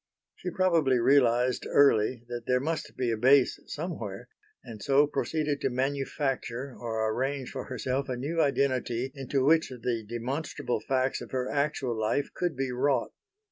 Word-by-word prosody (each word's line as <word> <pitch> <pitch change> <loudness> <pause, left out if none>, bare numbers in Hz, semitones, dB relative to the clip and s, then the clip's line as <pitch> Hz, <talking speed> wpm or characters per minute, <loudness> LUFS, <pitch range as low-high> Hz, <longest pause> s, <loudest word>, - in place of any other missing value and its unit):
She 180 - -5
probably 165 -8 +2
realised 125 -1 +3
early 120 -3 +4
that 120 -1 -6
there 125 0 +3
must 160 +4 -3
be 125 -2 0
a 115 - -1
base 130 +3 +4
somewhere, 145 - -5 0.3
and 110 -3 -10
so 140 +1 +4
proceeded 150 0 -1
to - - +1
manufacture 135 -1 -2
or 110 -2 -2
arrange 135 +1 -2
for 130 - -5
herself 130 +2 -2
a 125 - -2
new 160 +6 -1
identity 130 -3 0
into 135 0 -1
which 160 +2 +4
the 120 -2 -3
demonstrable 125 +1 -3
facts 130 +3 0
of - - -8
her 130 -1 -2
actual 140 -4 0
life 110 +6 0
could 175 -4 -1
be 135 -1 -1
wrought. 125 0 +1
130 Hz, 155 wpm, -28 LUFS, 120-140 Hz, 0.3 s, early